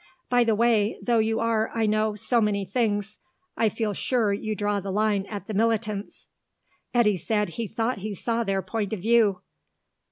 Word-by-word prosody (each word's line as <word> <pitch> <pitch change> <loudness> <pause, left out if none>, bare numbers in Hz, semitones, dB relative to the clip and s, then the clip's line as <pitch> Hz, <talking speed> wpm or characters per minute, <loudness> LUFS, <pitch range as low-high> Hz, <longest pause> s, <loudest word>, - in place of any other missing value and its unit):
By 245 -1 +5
the 225 -2 +2
way, 225 -2 +2
though 235 -2 +1
you 220 0 +1
are, 225 -1 +1
I 225 -1 +1
know, 215 0 +1
so 230 +3 +1
many 205 -2 0
things, 205 0 -1 0.4
I 225 - +2
feel 210 0 -2
sure 220 0 +1
you 215 +1 -3
draw 205 -1 0
the 195 0 -6
line 205 0 +1
at 205 -3 -6
the 215 - -5
militants." 215 -1 -1 0.7
Eddy 215 -5 +3
said 210 +3 -1
he 225 +6 -4
thought 225 +2 -2
he 205 +1 -5
saw 230 +4 -1
their 195 -2 -1
point 205 +2 -3
of 215 - -3
view. 215 -3 +3
215 Hz, 185 wpm, -25 LUFS, 205-230 Hz, 0.7 s, By